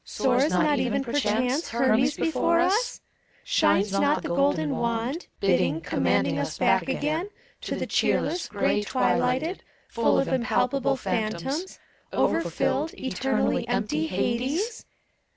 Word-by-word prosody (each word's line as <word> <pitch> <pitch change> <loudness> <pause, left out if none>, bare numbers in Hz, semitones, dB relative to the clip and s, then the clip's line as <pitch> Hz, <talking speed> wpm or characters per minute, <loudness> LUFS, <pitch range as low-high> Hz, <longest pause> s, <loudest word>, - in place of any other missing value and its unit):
Soars 260 +3 +1
not 295 -3 +2
even, 250 +3 0
perchance, 250 +3 0
Hermes 260 +3 +2
before 335 +1 +1
us? 395 +8 +1 0.4
Shines 200 +1 +2
not 285 +9 +1
the - - -4
golden 220 - +1
wand, 235 +7 -2
Bidding, 180 -5 +2
commanding 90 - 0
us 145 +2 -3
back 190 +6 +2
again 310 +7 -1 0.4
To - - -1
the - - -3
cheerless, 350 -1 0
gray 210 0 0
twilighted, 255 - 0 0.3
Full 230 -1 +2
of 270 - +1
impalpable 255 +2 +1
phantoms. 250 - -3 0.3
Over - - +1
filled, 320 +2 -1
eternally 265 -2 -1
empty 210 -10 -1
Hades? 260 - -2
255 Hz, 120 wpm, -25 LUFS, 210-290 Hz, 0.4 s, not